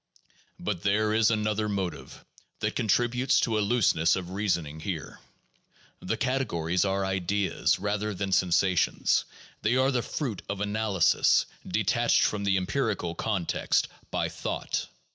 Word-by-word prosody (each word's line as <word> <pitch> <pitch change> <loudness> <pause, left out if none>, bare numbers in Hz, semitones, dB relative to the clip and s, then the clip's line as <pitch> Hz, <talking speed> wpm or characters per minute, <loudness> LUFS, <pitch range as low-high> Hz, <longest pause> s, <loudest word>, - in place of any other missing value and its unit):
But 100 -5 -3
there 105 +2 +2
is 110 0 +4
another 105 -1 0
motive 95 -6 -4 0.3
that - - -2
contributes 125 +5 +2
to 110 -2 +1
a - - +2
looseness 100 -7 +3
of 90 -1 -5
reasoning 85 -6 -1
here. 80 -4 -5 0.8
The - - -2
categories 90 -11 0
are 95 0 0
ideas 95 +1 0
rather 105 +2 -2
than 95 +1 -3
sensations; 90 0 +2 0.4
they 110 +4 +2
are 130 +1 +3
the 125 -2 +1
fruit 120 - -4
of 100 - -3
analysis, 105 -2 +2 0.2
detached - - +2
from 100 -1 0
the 95 -1 +3
empirical 95 -3 -1
context 95 -1 0 0.2
by - - -1
thought. - - -3
100 Hz, 130 wpm, -27 LUFS, 90-110 Hz, 0.8 s, is